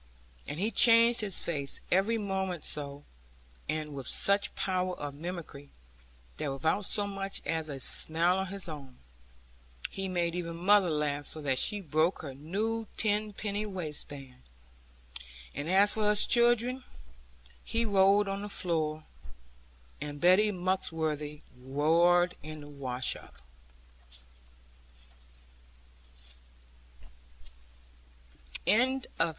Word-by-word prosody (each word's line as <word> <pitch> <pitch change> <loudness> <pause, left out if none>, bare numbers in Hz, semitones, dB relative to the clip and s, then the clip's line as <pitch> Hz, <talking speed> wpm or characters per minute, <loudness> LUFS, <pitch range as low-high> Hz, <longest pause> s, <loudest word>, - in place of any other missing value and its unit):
And 145 - -5
he 210 +4 0
changed 230 0 +5
his 200 -4 +3
face 140 -5 +3
every 200 +5 +2
moment 190 -4 -3
so, 145 -1 -3 0.7
and 155 -1 -3
with 135 -3 -6
such 200 +1 +2
power 185 -1 -1
of 145 -1 -6
mimicry 155 -3 -8 0.7
that 140 - -3
without 160 +9 -1
so 205 +2 +1
much 195 -1 -4
as 160 -1 -2
a 140 -2 -6
smile 170 +7 +5
of 190 - -2
his 195 0 -4
own, 140 -5 -9 0.9
he 195 0 -4
made 175 -2 -1
even 170 -1 -4
mother 195 +1 +4
laugh 145 -2 -1
so 155 - -5
that 135 -2 +1
she 205 -1 -1
broke 160 +1 0
her 140 -3 -6
new 210 +10 -3
tenpenny 210 0 -2
waistband; 145 -8 -3 1.1
and 145 +4 -5
as 200 +3 +4
for 215 -1 -1
us 210 0 +4
children, 240 +1 +2 0.9
we 230 +1 +1
rolled 200 0 +4
on 195 0 -3
the 205 - -6
floor, 155 -5 -2 1.0
and 145 -1 -6
Betty 185 +5 +5
Muxworthy 160 -5 -2 0.2
roared 165 +7 +2
in 155 0 -9
the 145 0 -11
wash 130 -3 -2
up. - - -14
175 Hz, 110 wpm, -30 LUFS, 150-200 Hz, 1.1 s, changed